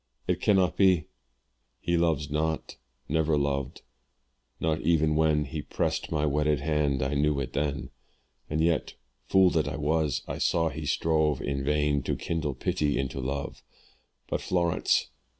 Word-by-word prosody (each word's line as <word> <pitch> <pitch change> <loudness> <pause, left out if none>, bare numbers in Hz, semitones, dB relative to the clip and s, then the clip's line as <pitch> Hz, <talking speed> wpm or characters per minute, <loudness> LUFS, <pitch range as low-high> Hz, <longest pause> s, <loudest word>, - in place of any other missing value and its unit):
it - - -1
cannot 95 -3 +3
be; 95 -5 +4 0.7
"He 85 - 0
loves 80 -4 +1
not, 80 +1 -1 0.3
never 80 0 +1
loved 70 -2 -2 0.8
not 80 0 0
even 80 -1 +2
when 75 -1 +2
"He 75 +3 -5
pressed - - -2
my 75 -2 +1
wedded 75 0 +1
hand 75 -3 +1
I 70 +1 -1
knew 75 0 +1
it 65 -1 -4
then; 70 -2 -2 0.6
"And 80 +1 0
yet 80 -1 +1 0.3
fool 95 -2 +5
that 80 -3 +1
I 70 - -3
was 75 +1 0
I - - -4
saw 85 -1 +2
he 75 +1 -6
strove 80 -2 +1
"In 70 -1 -2
vain 75 0 +1
to - - -2
kindle 80 -5 -2
pity 75 +3 0
into 70 0 -3
love. 70 +2 -4 0.7
"But - - -2
Florence! 85 -2 +1
75 Hz, 150 wpm, -28 LUFS, 70-80 Hz, 0.8 s, fool